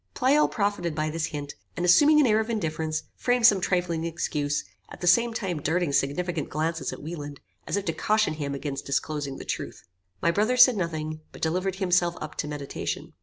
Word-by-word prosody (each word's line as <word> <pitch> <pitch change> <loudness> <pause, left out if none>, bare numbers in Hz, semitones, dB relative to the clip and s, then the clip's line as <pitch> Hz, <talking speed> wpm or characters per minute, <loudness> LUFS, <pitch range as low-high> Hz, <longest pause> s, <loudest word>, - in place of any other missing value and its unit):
Pleyel 280 +4 +4
profited 200 -6 -1
by 155 0 -1
this 160 0 -2
hint, 145 -2 -6 0.2
and 175 - 0
assuming 295 - +6
an 295 - +5
air 220 -2 +4
of 220 +1 -2
indifference, 160 -7 -2
framed 245 -1 +1
some 205 -5 +6
trifling 175 -3 0
excuse, 150 -3 -1 0.3
at - - -11
the - - -4
same 235 +7 +4
time 190 -8 -3
darting 165 0 0
significant 155 +4 0
glances 160 +2 -2
at - - -9
Wieland, 145 -3 -6 0.3
as - - 0
if 200 - -3
to - - -1
caution 215 -4 +1
him 145 -2 -4
against 140 0 -5
disclosing 140 0 -2
the - - -8
truth. - - -5 0.4
My 170 - +2
brother 215 +8 +1
said 250 -1 +8
nothing, 155 -4 -3
but - - -11
delivered 185 +4 0
himself 180 -2 +1
up 155 - -6
to 150 - -2
meditation. 145 -2 -5
170 Hz, 195 wpm, -26 LUFS, 155-200 Hz, 0.4 s, said